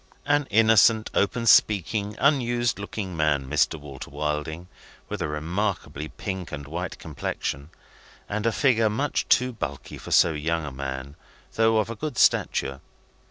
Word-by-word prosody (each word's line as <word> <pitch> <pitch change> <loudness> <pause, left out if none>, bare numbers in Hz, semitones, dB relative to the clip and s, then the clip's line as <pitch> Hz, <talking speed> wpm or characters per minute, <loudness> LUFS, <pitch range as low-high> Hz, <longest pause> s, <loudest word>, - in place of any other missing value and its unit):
An 145 -1 +2
innocent, 110 0 +4
open 115 +4 0
speaking, 105 -1 +3
unused 120 -6 +1
looking 100 -2 -5
man, 75 -4 +1
Mr. 80 - +1
Walter 70 -2 -9
Wilding, 75 +3 -3 0.4
with 105 -2 -4
a 80 - 0
remarkably 80 0 -3
pink 95 +1 -6
and 70 -1 -6
white 85 +4 -5
complexion, 70 +2 -4 0.6
and 105 +2 -2
a - - +3
figure 115 -3 +3
much 135 +7 -1
too 125 0 +3
bulky 115 - -6
for - - -10
so - - +5
young 80 +1 -2
a 70 - -5
man, 65 +1 -6 0.4
though 115 0 +3
of 110 +1 0
a - - -5
good 150 +3 -5
stature. 65 0 +2
95 Hz, 150 wpm, -25 LUFS, 75-115 Hz, 0.6 s, so